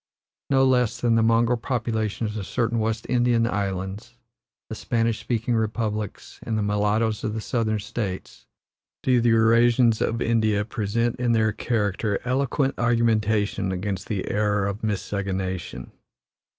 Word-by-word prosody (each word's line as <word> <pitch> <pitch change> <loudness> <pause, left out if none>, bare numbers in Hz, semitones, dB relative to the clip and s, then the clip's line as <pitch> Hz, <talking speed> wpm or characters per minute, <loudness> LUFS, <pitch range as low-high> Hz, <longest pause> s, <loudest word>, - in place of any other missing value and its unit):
No 135 -1 +4
less 125 -3 +2
than 120 -1 +2
the 115 - +4
mongrel 115 +1 +3
populations 110 -3 -2
of 100 -3 -5
certain 115 -1 0
West 110 0 -1
Indian 120 -2 +2
islands, 100 +1 -3 0.5
the - - -6
Spanish 115 0 -1
speaking 120 0 -1
republics, 110 -2 -3
and 110 -2 -2
the 105 - 0
mulattoes 105 +2 0
of 110 0 -2
the - - -2
Southern 110 -1 -1
States, 105 -2 -5 0.6
do 125 -2 +3
the 120 - +3
Eurasians 115 +1 +4
of 115 - 0
India 110 -3 +1
present 115 +1 -1
in 120 -1 +1
their 110 -1 +2
character 105 -2 -1
eloquent 135 +2 0
argumentation 110 -4 +1
against 95 0 -3
the 100 -4 -3
error 105 -1 +1
of 100 +2 -3
miscegenation. 95 - -3
110 Hz, 140 wpm, -24 LUFS, 105-115 Hz, 0.6 s, No